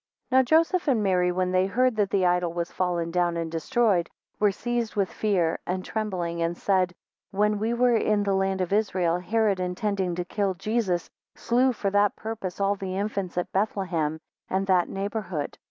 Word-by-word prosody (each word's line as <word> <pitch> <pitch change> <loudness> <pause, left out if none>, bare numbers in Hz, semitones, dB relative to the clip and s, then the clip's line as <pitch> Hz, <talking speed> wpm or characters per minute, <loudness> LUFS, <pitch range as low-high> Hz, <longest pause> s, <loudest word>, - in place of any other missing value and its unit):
NOW 260 +1 +6
Joseph 325 +7 +2
and 240 -7 +2
Mary 180 -2 +2
when 180 0 0
they 185 +1 +2
heard 250 +4 +2
that 205 -2 +2
the 195 -2 +2
idol 175 -1 +2
was 170 0 -3
fallen 175 -2 -1
down 175 -1 +1
and 165 -1 -3
destroyed, 195 0 +1 0.3
were 210 -1 +4
seized 240 +2 -3
with 195 -3 0
fear 185 -6 +1
and, 185 +1 -2
trembling, 180 -6 -3
and 170 +1 -1
said, 185 -2 +1 0.3
When 210 +1 +1
we 225 +3 0
Were 245 0 +3
in 215 -2 +2
the 200 -1 +1
land 190 0 0
of 185 +1 -1
Israel, 185 -5 +1
Herod, 205 +1 +1
intending 185 0 -1
to 180 0 -3
kill 195 0 -1
Jesus, 195 -2 -1 0.3
slew 250 +2 +2
for 205 -4 -2
that 205 0 +3
purpose 215 -5 -5
all 200 0 +2
the 190 -1 -5
infants 200 -3 -3
at 180 - -2
Bethlehem, 180 -6 -1 0.3
and 190 +1 0
that 185 -2 +2
neighbourhood. 195 -6 -4
195 Hz, 185 wpm, -26 LUFS, 180-215 Hz, 0.3 s, NOW